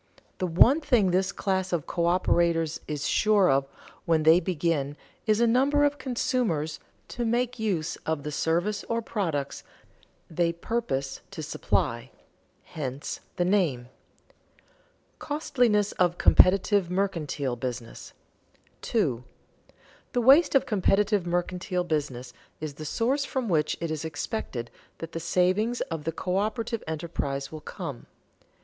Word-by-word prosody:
The 185 - 0
one 235 - +5
thing 225 - +3
this 185 +1 +1
class 190 -1 -1
of 170 -5 -1
coöperators 170 -2 +1
is 150 -1 -3
sure 210 -6 +4
of 135 0 +2 0.4
when 160 -2 +2
they 160 +2 +7
begin 160 -5 -1 0.3
is 215 0 +3
a 235 - +4
number 270 +5 +3
of 290 -1 +1
consumers 235 - -1 0.3
to 240 - -3
make 240 +1 0
use 180 -7 -1
of 160 -3 -3
the 150 - -4
service 175 +8 0
or 230 0 -2
products 165 -12 -3 0.6
they 170 +1 0
purpose 170 - -3
to - - -7
supply; - - -1 0.5
hence 140 -2 -5 0.2
the 175 - +1
name. 165 -11 +1
[Sidenote: - - -30 1.3
Costliness 245 -9 +1
of 175 -1 +3
competitive 195 0 +5
mercantile 165 -9 -1
business] 120 -1 -6 0.7
2. 140 - 0 0.9
_The 245 - +1
waste 280 +6 +6
of 270 - +4
competitive 205 -3 +2
mercantile 180 +1 -1
business 140 -7 -3 0.3
is 155 -2 -5
the 155 +2 -8
source 260 - 0
from 260 -4 -3
which 155 -5 +1
it 165 -1 -3
is 155 -1 -3
expected 145 - -4 0.3
that 165 0 -7
the 165 - -4
savings 185 +8 +1
of 160 -2 -4
the 165 - 0
coöperative 215 +7 -2
enterprise 150 -4 -3
will 155 -1 -8
come. - - -7
175 Hz, 130 wpm, -27 LUFS, 155-215 Hz, 1.3 s, they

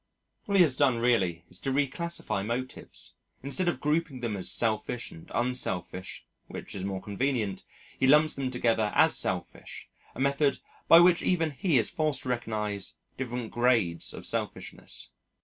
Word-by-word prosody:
All 200 - 0
he 185 - +8
has 145 -6 +2
done 130 -4 +3
really 95 -9 +1
is 90 - -11
to - - -3
reclassify 145 - -1
motives 125 +4 -5 0.3
instead 155 +7 -1
of 175 - 0
grouping 150 -3 -1
them 115 -3 -2
as 95 - -3
selfish 115 +1 -1
and 80 - -13
unselfish 95 -7 -2 0.2
(which - - -7
is 95 - -5
more 95 -1 -3
convenient) 110 -2 -1 0.4
he 130 - +3
lumps 150 +3 +5
them 135 -2 -2
together 115 -4 +1
as - - +6
selfish, - - -1 0.3
a - - -9
method 140 +1 +2 0.3
by 165 - +9
which 175 -1 +5
even 165 -4 +1
he 150 +1 +1
is 115 - +1
forced 155 -4 -1
to 130 - -5
recognise 105 -5 -2 0.2
different 125 -3 -4
grades 115 -9 +1
of - - -8
selfishness. - - -5
125 Hz, 160 wpm, -28 LUFS, 105-145 Hz, 0.4 s, by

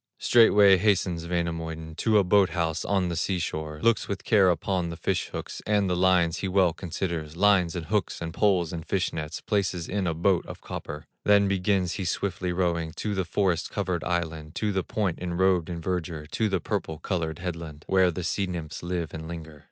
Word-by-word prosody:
Straightway 105 -4 +6
hastens 90 -4 +1
Wainamoinen 80 -2 -3
To 110 +2 +3
a 100 - +5
boat 95 +1 +4
house 80 -2 0
on 95 -3 +1
the 85 - -2
sea 95 +2 0
shore, 80 -2 -4
Looks 115 0 +3
with 100 -2 -4
care 100 -5 +4
upon 90 0 0
the 85 - -6
fish - - -1
hooks, - - -6
And 105 -2 +2
the 90 - +1
lines 90 -2 +3
he 95 - -2
well 95 -3 +3
considers; 85 -3 -4
Lines, 95 -4 +3
and 85 -2 -4
hooks, 105 0 -1
and 80 -1 -5
poles, 90 -4 +2
and 80 -2 -4
fish 90 +2 -1
nets, 75 -2 -5
Places 95 -5 -1
in 100 -2 -1
a 80 - -1
boat 90 +2 +2
of - - -8
copper, 75 0 -7 0.2
Then 100 -1 +5
begins 95 -2 +1
he 95 - -4
swiftly 90 0 -2
rowing 85 -3 -1
To 105 +4 -3
the 95 -2 -1
forest 90 0 0
covered 90 -5 -2
island, 80 -3 -3
To 105 -1 0
the 95 -1 0
point 100 -6 -2
enrobed 90 -1 +1
in 85 -1 -4
verdure, 85 -3 -3
To 110 -2 0
the 95 -2 0
purple 80 0 -3
colored 80 -2 -2
headland, 85 -4 -6
Where 95 -1 +4
the 90 +1 -4
sea 95 +2 -1
nymphs 85 -4 -5
live 85 -2 -3
and 80 0 -6
linger. 80 -2 -8
90 Hz, 200 wpm, -26 LUFS, 80-95 Hz, 0.2 s, Straightway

